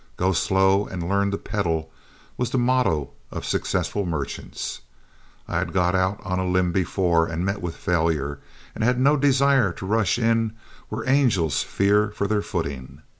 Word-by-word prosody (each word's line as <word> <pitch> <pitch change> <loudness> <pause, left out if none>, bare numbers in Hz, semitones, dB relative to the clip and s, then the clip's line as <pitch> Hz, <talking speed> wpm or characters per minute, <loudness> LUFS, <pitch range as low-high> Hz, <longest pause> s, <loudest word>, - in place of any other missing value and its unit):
"Go 95 +1 +2
slow 95 +2 +2
and 85 -2 -5
learn 100 +1 +1
to 100 - -2
peddle," 85 -8 -2 0.4
was 125 -2 -1
the 130 - -1
motto 125 - +1 0.2
of - - -6
successful 100 - -1
merchants; 80 -6 -4 0.7
I - - -1
had - - -3
got 90 -2 +2
out 95 +2 +1
on 90 0 -2
a 95 - -1
limb 90 -1 +2
before 85 -2 +1
and 85 +2 -3
met 100 +1 -2
with 85 -2 -4
failure, 80 -5 0 0.3
and - - -4
had 125 +2 +2
no 140 +3 +4
desire 140 -5 +3
to 95 - -8
rush 110 0 +1
in 115 -2 +1 0.4
where 110 +2 -5
angels 120 - +2
fear 105 +2 +2
for 100 - -1
their 105 0 +1
footing. 70 -3 -5
95 Hz, 170 wpm, -24 LUFS, 85-110 Hz, 0.7 s, no